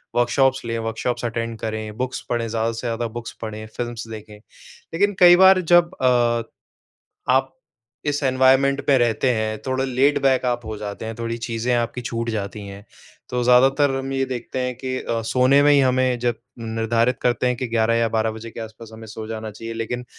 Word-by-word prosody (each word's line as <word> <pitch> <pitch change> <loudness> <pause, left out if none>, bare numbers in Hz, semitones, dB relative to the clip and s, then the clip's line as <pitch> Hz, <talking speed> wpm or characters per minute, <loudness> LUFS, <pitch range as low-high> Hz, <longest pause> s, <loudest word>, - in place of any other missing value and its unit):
Workshops 130 +2 +2
लें, 115 0 -2
workshops 115 +2 -3
attend 115 0 -3
करें, 110 0 -5
books 130 0 -3
पढ़ें 120 -1 -1
ज़्यादा 115 +1 -1
से 115 +2 -5
ज़्यादा 115 0 -2
बुक्स 115 - -8
पढ़ें 110 -1 -6
फ़िल्म्स 120 -1 -4
देखें। 110 -1 -9 0.6
लेकिन 205 +4 +1
कई 175 -1 +9
बार 190 0 +6
जब 175 0 +5
अ, 120 -2 +3 0.9
आप 135 0 +1 0.5
इस 145 0 -1
एनवायरनमेंट 130 +1 +3
में 140 - +6
रहते 120 +2 +1
हैं 110 -1 -2
थोड़ा 130 0 0
लेड 135 +2 +2
बैक 130 -1 +3
आप 120 -1 -1
हो 110 - -5
जाते 105 +1 -6
हैं 115 - -5
थोड़ी 115 0 -3
चीज़ें 115 +1 -1
आपकी 120 +1 -1
छूट 115 0 -3
जाती 105 -1 -5
हैं। 100 +1 -10 0.5
तो 125 0 -1
ज़्यादातर 135 +3 +4
हम 135 0 -4
ये 135 0 0
देखते 130 0 -5
हैं 125 0 -2
कि 130 0 -4
अ, 115 -1 -2
सोने 130 +4 +3
में 145 - +5
ही 145 - +5
हमें 130 -1 +2
जब 120 0 +1 0.2
निर्धारित 115 +2 0
करते 125 0 +1
हैं 125 -1 +1
कि 130 0 -3
11 115 0 +2
या 115 0 +2
12 110 0 0
बजे 110 +1 -8
के 115 - -9
आस-पास 110 0 -9
हमें 110 0 -10
सो 110 0 -8
जाना 110 0 -5
चाहिए। 115 +2 -8
लेकिन 120 +2 -4
120 Hz, 195 wpm, -22 LUFS, 115-130 Hz, 0.9 s, कई